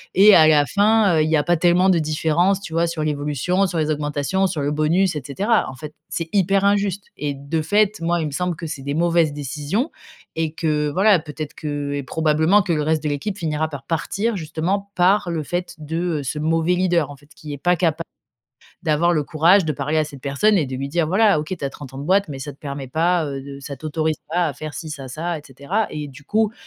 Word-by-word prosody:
et 200 +2 +8
à 160 -3 +7
la 150 -2 +5
fin, 205 -1 +3
heu, - - +4
il 155 - 0
y 160 - +3
a 145 - +1
pas 175 0 +2
tellement 180 +3 +4
de 175 -3 +4
différence, 160 +5 +1
tu 165 - -8
vois, 170 +1 +2
sur 165 -2 -3
l'évolution, 150 +6 0
sur 175 - -4
les 155 -1 +1
augmentations, 150 +6 0
sur 160 -5 -3
le 145 +1 0
bonus, 165 +4 +2
et 150 - -3
cetera. 205 - +1
En 130 - -9
fait, 150 +3 -9 0.2
c'est 165 -1 -4
hyper 195 0 +2
injuste 200 -1 +1
et 145 -1 -3
de 140 +4 -3
fait, 210 +4 +2
moi, 170 +1 +1
il - - -1
me 150 - -4
semble 180 +3 -1
que 165 - -7
c'est 150 -3 -5
des 140 +2 -3
mauvaises 170 -2 +2
décisions 150 - -2 0.4
et 160 -1 -1
que, 150 -2 0
voilà, 195 +4 +4
peut-être 150 -1 -7
que 145 -2 -4
et 140 - -2
probablement 160 +7 +2
que 175 -4 0
le 150 - 0
reste 155 0 0
de 150 - 0
l'équipe 190 +8 -3
finira 155 -2 -1
par 140 -3 -8
partir 200 +8 -1
justement 180 +5 -2
par 185 +1 +3
le 160 -2 -2
fait 175 +4 -4
de, 155 +2 -5 0.2
heu, - - -5
ce 150 +3 -3
mauvais 165 +3 +1
leader, 175 -5 +1
en - - -9
fait, 145 +1 -22
qui 150 -2 -8
est - - -5
pas 180 +3 +2
capa 165 -1 0 0.8
d'avoir 165 +2 +2
le 155 -3 +1
courage 170 +5 +4
de 155 - 0
parler 145 +3 -2
à 155 - +2
cette 140 -3 -10
personne 170 +10 +2
et 150 - 0
de 130 - -6
lui 135 +1 -4
dire: 165 +1 0
«Voilà, 195 0 +3
OK, 155 +5 -4
tu - - -5
as 135 - -1
30 135 -2 -11
ans - - -7
de 140 - -5
boîte, 195 +1 +2
mais 135 -2 -6
ça 145 +1 -6
te - - -22
permet 140 -2 -6
pas, 170 +3 +1
heu, 135 -1 -4
de 140 0 -9
ça 140 0 -7
t'autorise 155 +2 -2
pas 175 0 +1
à - - -4
faire 155 -2 -7
ci, 160 +1 -6
ça, 135 -3 -7
ça 165 +4 -3
et - - -13
cetera» 140 - -2
et 150 -1 -5
du 140 +1 -14
coup, 215 0 +1
160 Hz, 250 wpm, -21 LUFS, 145-180 Hz, 0.8 s, et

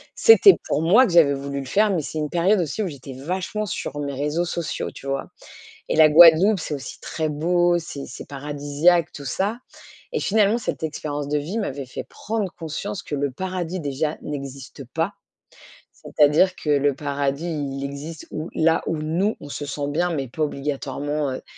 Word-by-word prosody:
C'était 440 -4 +7
pour 145 - 0
moi 200 +11 +6
que 190 - -2
j'avais 155 -5 +6
voulu 140 0 -4
le 135 - -6
faire, 210 +9 +3
mais 175 -4 0
c'est 155 - -6
une 150 -1 -2
période 180 +5 +2
aussi 170 +5 -2
où 200 - -1
j'étais 135 -3 -8
vachement 185 +10 -3
sur 145 -6 -5
mes 140 -1 -3
réseaux 150 +5 -1
sociaux, 170 -1 -3
tu 140 - -11
vois? 135 0 -2 0.6
Et - - 0
la 155 -1 +8
Guadeloupe, 170 +5 +7
c'est 150 - -4
aussi 140 - -8
très 160 -1 -3
beau, 175 +3 +2
c'est 145 -4 -7
c'est - - -10
paradisiaque 145 +4 +1
tout 140 - -9
ça, 200 - -1 0.5
et 460 - -1
finalement, 210 +1 +3
cette 220 - -4
expérience 145 -2 -4
de 150 +1 +1
vie 170 +10 -4
m'avait 140 - -4
fait - - -7
prendre 215 -3 -4
conscience 165 +5 -5
que - - -5
le 140 0 -1
paradis, 185 +3 -4
déjà, 150 +1 -2
n'existe 140 -2 -7
pas. 165 +5 0 0.8
C'est-à-dire 155 +5 +3
que 150 - -3
le 145 -1 +3
paradis, 140 +2 -2
il 140 -3 -3
existe 145 +3 -7
ou 155 +2 -5
là 160 0 +2
où 165 - -1
nous, 165 +8 0
on 145 - -9
se 145 - -5
sent 145 0 -3
bien, 175 +5 0
mais 135 -4 -3
pas 155 +6 -4
obligatoirement, 145 0 -3
heu. 130 - -6
155 Hz, 190 wpm, -23 LUFS, 140-175 Hz, 0.8 s, la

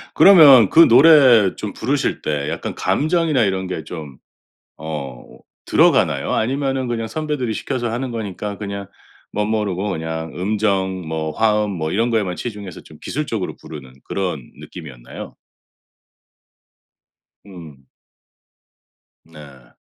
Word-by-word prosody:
그러면 145 - +8
그 165 +1 +7
노래 130 - +6
좀 105 -2 -6
부르실 135 +4 -2
때 75 -1 -2
약간 - - -5
감정이나 155 -4 +1
이런 95 -2 -1
게 85 -3 -5
좀 75 -4 -9 0.7
어 70 -6 -6 0.4
들어가나요? - - +2
아니면은 135 +2 -1
그냥 115 -1 -3
선배들이 150 -5 -3
시켜서 120 +1 -3
하는 125 +2 -3
거니까 105 -2 -5
그냥 100 -1 -6 0.5
멋모르고 105 -2 -2
그냥 80 -2 -5
음정 95 -2 -1
뭐 80 -1 -3
화음 105 0 +1
뭐 80 -4 -3
이런 115 +4 +1
거에만 105 -6 -1
치중해서 105 -6 -7
좀 - - -16
기술적으로 115 -10 -4
부르는 70 -5 -11
그런 90 -6 -3 0.2
느낌이었나요? 60 -5 -11 2.1
음. 80 -9 -13 1.4
네. 70 -6 -16
100 Hz, 265 characters per minute, -19 LUFS, 80-120 Hz, 2.1 s, 그러면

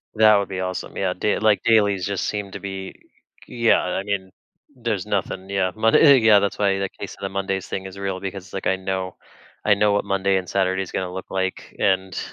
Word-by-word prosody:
That 110 -1 +6
would 100 -1 0
be 95 -1 -4
awesome, 95 0 -4
yeah. 95 -2 0
Day 105 - 0
like, 105 -1 +3
dailies 105 -5 +3
just 100 -2 -2
seem 105 -2 -3
to - - -7
be 95 -1 -6 0.5
yeah, 115 -1 +3
I 95 - -2
mean, 100 -2 -3 0.5
there's 115 -6 -2
nothing, 95 -2 -3
yeah, 95 -2 0
Monday 130 +5 +6
yeah, 110 -2 +6
that's 100 0 -1
why 100 -1 +2
the 95 - -2
case - - -6
of - - -20
the 95 - -2
Monday's 95 -1 -3
thing 95 0 -4
is 95 +1 -9
real, 95 -1 -3
because, 95 -1 -7
like, 95 - -3
I 95 - +3
know 95 -1 -3 0.5
I 105 - +5
know 105 0 +3
what 100 - 0
Monday 95 0 +1
and 90 -1 -4
Saturday 95 -1 +1
is - - -10
gonna 90 -1 -3
look 95 - -7
like, 95 0 -3
and 95 -1 +1
95 Hz, 220 wpm, -22 LUFS, 95-105 Hz, 0.5 s, That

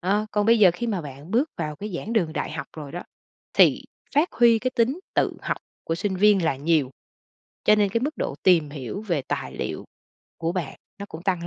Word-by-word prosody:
Ờ, 205 +4 +1
còn 210 0 +1
bây 230 0 +5
giờ 190 -4 +7
khi 235 +6 -3
mà 205 -5 -1
bạn 145 +2 -10
bước 260 +8 +2
vào 150 -1 -3
cái 205 +4 -6
giảng 220 - -5
đường 175 -9 +1
đại - - -3
học - - -5
rồi 145 -3 -7
đó, 175 - -5 0.5
thì - - +5 0.3
phát 305 +5 +3
huy 235 -2 +5
cái 255 +3 -1
tính 255 +9 +1
tự - - +1
học - - -1 0.3
của 165 - -1
sinh 190 +2 -2
viên 200 -2 +4
là 135 - +1
nhiều, 145 -2 +1 0.7
cho 210 - +6
nên 210 -1 +3
cái 230 +4 0
mức 295 +4 -2
độ - - -2
tìm 165 -5 +4
hiểu 145 - -5
về 170 -10 -1
tài - - -4
liệu - - -4 0.5
của 165 +1 -1
bạn 175 -6 -4 0.2
nó 200 - -6
cũng 160 +2 -9
tăng 180 -3 -1
190 Hz, 225 wpm, -24 LUFS, 160-220 Hz, 0.7 s, giờ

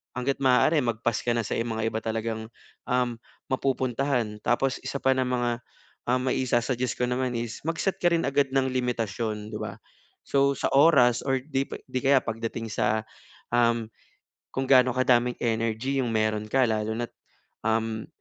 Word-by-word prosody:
hangga't 130 +2 -1
maaari 135 +5 +4
mag-pass 115 -1 0
ka 120 - +2
na 115 - 0
sa - - -3
mga 115 -1 -1
iba 110 - -2
talagang, 110 0 -3 0.4
um, 125 -1 +1 0.4
mapupuntahan. 130 -4 0
Tapos 130 +2 +1
1 - - -3
pa 135 - +4
ng 130 0 +1
mga 125 -1 0 0.6
maisu-suggest 125 -1 0
ko - - +1
naman 125 0 -1
is 115 -1 -4
mag-set 165 +4 -1
ka 175 - +3
rin 165 - 0
agad 140 0 +2
ng 135 - +4
limitasyon 115 -3 -2
'di 105 - -4
ba? - - -5 0.5
So 140 0 +2
sa - - 0
oras 135 -5 +6
or 135 -1 +1
'di 135 -1 -1
pa - - -5
'di 130 - -2
kaya 135 0 +5
pagdating 115 0 -4
sa, 110 +1 +1 0.5
um, 115 -2 +2 0.7
kung 135 0 -2
gaano 130 -1 +6
kadaming 125 -1 +3
energy 115 +3 0
'yong 125 -3 -1
meron 110 -1 0
ka 135 +1 +4
lalo 110 0 -1
na't, 120 0 -3 0.6
um, 110 0 0
120 Hz, 160 wpm, -26 LUFS, 115-130 Hz, 0.7 s, oras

